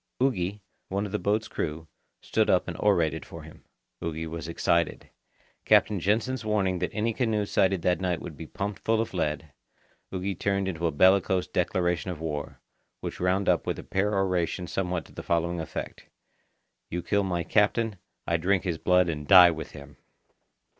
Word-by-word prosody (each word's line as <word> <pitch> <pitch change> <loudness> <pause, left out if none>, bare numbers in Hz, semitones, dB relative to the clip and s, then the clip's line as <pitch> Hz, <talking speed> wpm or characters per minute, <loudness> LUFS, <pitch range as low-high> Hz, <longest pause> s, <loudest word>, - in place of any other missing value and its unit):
Ugi, 105 -6 0 0.3
one 100 +2 -1
of 100 - -6
his 105 - -2
boat's 110 +2 0
crew, 80 +1 -4 0.4
stood - - +1
up - - +3
and - - -4
orated 85 -7 +2
for - - -10
him. - - -14 0.4
Ugi 80 0 -3
was 80 0 -6
excited. 85 0 0 0.5
Captain 105 - +4
Jansen's 115 +7 0
warning 100 -4 0
that 90 - -1
any 115 +1 -1
canoe 110 -4 0
sighted 95 -2 +1
that 90 0 +1
night 90 -3 0
would 80 - -8
be 80 +1 -8
pumped 100 +4 -4
full 110 0 +1
of 115 - -2
lead, 75 -4 -2 0.6
Ugi 95 +1 -2
turned 100 -1 0
into 85 -2 -1
a - - 0
bellicose 95 +3 +4
declaration 90 -2 0
of 90 -4 -5
war, 75 -3 -4 0.4
which - - -5
wound 95 +2 +1
up 90 -3 +2
with - - -1
a - - -7
peroration 95 -3 0
somewhat 90 -3 -2
to - - -17
the - - -7
following 85 0 0
effect: 80 - -7 0.8
"You 90 0 -3
kill 100 +3 +1
my 90 -3 -1
captain, 105 +2 +1 0.3
I 85 - +1
drink 95 +3 +1
his 85 -4 -2
blood 90 0 +3
and 75 -3 -4
die 90 -2 +9
with 80 -1 -6
him!" 70 0 -12
90 Hz, 175 wpm, -27 LUFS, 85-100 Hz, 0.8 s, die